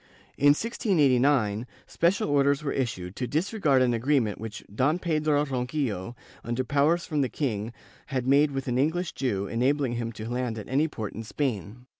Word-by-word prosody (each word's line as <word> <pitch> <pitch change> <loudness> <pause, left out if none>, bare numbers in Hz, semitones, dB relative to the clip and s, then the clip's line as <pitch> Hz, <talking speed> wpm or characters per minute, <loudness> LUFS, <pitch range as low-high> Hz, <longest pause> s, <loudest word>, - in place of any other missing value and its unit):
^ - - -31 0.3
In 145 +1 +5
1689, 135 - +2 0.2
special 185 +6 +1
orders 140 +1 +3
were 140 - -1
issued 95 -8 -3
to 125 - -2
dis 165 - -1
regard 145 -12 +3
an 125 -1 +2
agreement 115 -3 +1
which 110 -1 -7
Don 140 +9 +2
Pedro 155 -4 +1
Ronquillo, 125 -6 -2 0.3
under 120 +2 -1
powers 145 +6 +2
from 150 -2 -1
the 130 - 0
king, 115 -6 -2 0.4
had 130 -3 -2
made 140 +3 +4
with 135 -1 -4
an 125 0 0
English 160 +5 0
Jew, 105 -7 -1
enabling 125 +3 0
him 115 -1 -3
to 110 +1 -7
land 120 -1 -2
at 105 - -7
any 140 +5 +2
port 110 -9 -6
in 110 - -6
Spain. 115 - -3
130 Hz, 180 wpm, -27 LUFS, 115-150 Hz, 0.4 s, In